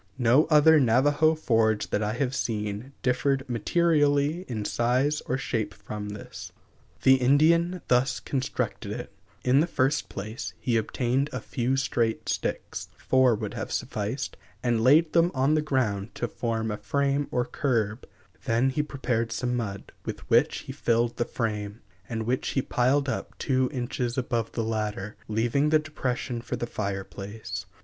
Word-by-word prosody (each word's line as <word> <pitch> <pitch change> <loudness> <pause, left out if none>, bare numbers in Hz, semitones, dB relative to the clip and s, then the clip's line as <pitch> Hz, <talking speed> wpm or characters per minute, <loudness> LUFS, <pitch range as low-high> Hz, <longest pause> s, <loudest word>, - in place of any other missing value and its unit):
No 125 +4 +4
other 155 0 +6
Navajo 145 +6 +4
forge 110 -7 +1
that 105 - +1
I 105 0 0
have 125 +1 -1
seen 105 0 -3
differed 130 +2 +1
materially 145 - +2
in 110 -4 -3
size 130 +7 +1
or 130 - 0
shape 115 -5 -2
from 105 +1 -6
this. 105 0 -8 0.5
The 130 0 +7
Indian 165 +7 +3
thus 125 +1 +2
constructed 135 -1 -3
it: - - -7 0.3
In 130 +2 +4
the 160 - +3
first 145 -1 0
place, 110 +6 -6
he 125 -4 0
obtained 125 +5 0
a - - -3
few 130 0 -1
straight 115 -4 0
sticks - - -3
four 130 -3 +3
would - - -5
have - - -5
sufficed 110 +6 -3 0.3
and 120 -2 +2
laid 155 +5 +5
them 170 0 +5
on 135 +3 +3
the 155 - +3
ground 115 -8 -1
to 120 - -2
form 110 -1 -2
a 105 - -3
frame 140 +6 0
or 125 -1 0
curb; 115 -5 -1 0.4
then 120 +4 +2
he 150 - 0
prepared 125 -6 -2
some 125 +2 -1
mud, 100 -5 -4
with - - -6
which - - +3
he - - -8
filled 120 0 0
the 120 - +1
frame, 105 -2 -3 0.3
and 110 -1 -3
which 125 +3 -1
he 135 - +2
piled 135 +3 +2
up 130 - -4
two 130 -2 +1
inches 125 -2 -3
above 120 -3 -1
the 115 - -1
latter, 105 -2 -3
leaving 120 +7 +1
the 155 - +5
depression 130 -5 -3
for 125 - -4
the 120 - -3
fire 100 -4 -3
place. 95 -2 -7
125 Hz, 160 wpm, -27 LUFS, 110-140 Hz, 0.5 s, The